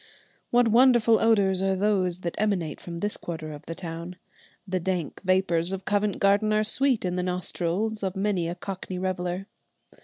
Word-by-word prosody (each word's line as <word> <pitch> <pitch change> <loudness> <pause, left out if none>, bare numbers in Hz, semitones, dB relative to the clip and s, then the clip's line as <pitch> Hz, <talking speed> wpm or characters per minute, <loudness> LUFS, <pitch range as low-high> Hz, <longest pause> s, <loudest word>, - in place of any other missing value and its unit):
What 245 0 +4
wonderful 235 -1 +5
odours 200 -4 +3
are 195 0 +1
those 185 -3 0
that 170 -2 -3
emanate 195 -7 -1
from 170 -1 -7
this 205 +4 -2
quarter 160 -2 -6
of 145 - -12
the 165 - -5
town! 170 +1 -7 0.5
The 185 0 -1
dank 180 -3 -3
vapours 185 -2 +2
of 190 -1 -5
Covent 205 0 0
Garden 200 +2 +3
are 215 0 +3
sweet 250 +1 +1
in 180 0 -1
the - - +1
nostrils 180 +4 -2
of 190 -1 -2
many 195 -3 0
a 175 - -4
cockney 185 0 -6
reveller. 180 0 -2
190 Hz, 175 wpm, -26 LUFS, 175-210 Hz, 0.5 s, wonderful